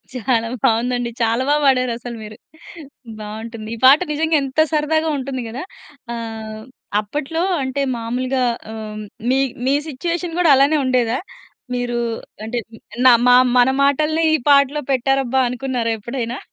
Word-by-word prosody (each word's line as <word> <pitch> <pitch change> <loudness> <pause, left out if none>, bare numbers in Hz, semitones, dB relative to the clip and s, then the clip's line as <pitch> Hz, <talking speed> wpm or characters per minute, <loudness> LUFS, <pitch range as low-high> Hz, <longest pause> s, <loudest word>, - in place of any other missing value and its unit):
చాలా 235 -2 0 0.2
బావుందండి. 240 +1 +1
చాలా 230 +3 +1
బా 295 - +4
పాడారు 255 -2 +3
అసలు 240 -1 -7
మీరు. 215 0 -10 0.8
బావుంటుంది 220 +1 -7
ఈ - - -10
పాట 275 +3 +8
నిజంగా 320 +1 +1
ఎంత 270 +3 -3
సరదాగా 315 +1 +1
ఉంటుంది 260 -1 -4
గదా. 255 +6 -6 0.5
ఆహ్, 220 -2 -6 0.4
అప్పట్లో 295 +9 -3 0.2
అంటే 260 +2 -2 0.2
మామూలుగా 250 +3 -1 0.3
ఆహ్, 215 -1 -7 0.3
మీ, 265 - +3 0.3
మీ 275 - +3
సిచుయేషన్ 335 +4 -3
గూడా 340 -4 +5
అలానే 280 +3 +4
ఉండేదా? 250 -1 +1 0.6
మీరు 245 -1 -2 0.4
అంటే 235 +2 -3 0.5
నా 255 - +9 0.2
మా 245 - +7 0.2
మన 245 +1 +5
మాటల్ని 305 +3 +2
ఈ - - +5
పాటలో 280 +1 +4
పెట్టారబ్బా 265 0 +1
అనుకున్నారా 245 -2 -2
ఎప్పుడైనా? 240 +2 -4
255 Hz, 135 wpm, -19 LUFS, 230-280 Hz, 0.8 s, నా